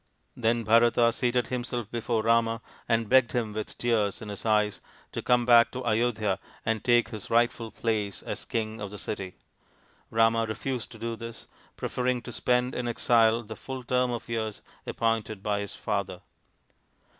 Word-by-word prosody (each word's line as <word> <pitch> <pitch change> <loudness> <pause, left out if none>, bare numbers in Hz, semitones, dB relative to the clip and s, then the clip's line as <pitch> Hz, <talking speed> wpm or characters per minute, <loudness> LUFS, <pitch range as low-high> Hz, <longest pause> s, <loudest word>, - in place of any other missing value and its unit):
Then^Bharata 115 0 +3
seated 125 -1 +1
himself 120 -3 -3
before 115 -1 -1
Rama 115 0 +2 0.3
and 115 -1 +2
begged 130 0 +4
him 115 -4 -1
with 110 0 -5
tears 110 -5 +1
in 110 - -8
his 100 +2 -5
eyes 105 -1 +2 0.3
to - - -4
come 120 -1 +3
back 120 -1 +7
to 125 -1 -5
Ayodhya 110 -4 +1 0.3
and 110 -1 0
take 120 -1 +4
his 110 -3 -7
rightful 115 -1 +2
place 110 -3 -2
as - - -5
king 110 -1 -3
of 100 - -4
the 105 - -8
city. 95 -3 -5 0.7
Rama 115 0 +3
refused 120 +3 -4
to - - -11
do 115 +1 -3
this, 115 0 -8 0.3
preferring 125 -1 -1
to 120 - -7
spend 125 +2 +1
in 125 - -2
exile 115 -1 +3
the 110 0 -8
full 130 +1 -7
term 125 +1 +1
of 120 -1 -4
years 110 -2 -3 0.2
appointed 110 -3 -1
by 105 -1 0
his 100 -2 -6
father. - - -3
115 Hz, 165 wpm, -28 LUFS, 110-120 Hz, 0.7 s, back